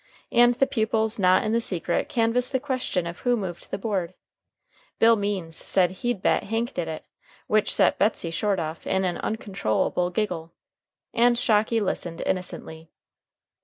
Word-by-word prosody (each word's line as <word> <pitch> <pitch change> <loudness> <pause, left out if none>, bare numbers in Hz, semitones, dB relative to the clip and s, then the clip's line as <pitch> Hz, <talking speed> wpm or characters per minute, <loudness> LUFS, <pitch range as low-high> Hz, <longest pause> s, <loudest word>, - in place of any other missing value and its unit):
And 240 0 +5
the 270 - +3
pupils 220 -2 0
not 185 -1 +4
in 215 - -1
the 230 +1 +2
secret 175 -5 -1
canvassed 235 +2 +1
the 260 - +1
question 255 -10 -2
of 170 +1 -6
who 245 -1 +1
moved 185 -5 -6
the - - -3
board. 190 -4 -2 0.8
Bill 230 0 +6
Means 200 -6 -3
said 180 0 +2
he'd 210 +2 -3
bet - - +2
Hank 225 +3 -2
did 170 - -3
it, 160 -1 -6 0.4
which 215 0 +2
set - - +3
Betsey 195 -5 +1
Short 200 +3 0
off 160 -1 -5
in 190 0 +1
an 175 -1 -2
uncontrollable 190 - -1
giggle. 175 -4 -3 0.6
And 240 +1 +4
Shocky 225 -1 +2
listened 175 -4 -3
innocently. 165 -3 -4
205 Hz, 160 wpm, -25 LUFS, 175-230 Hz, 0.8 s, Bill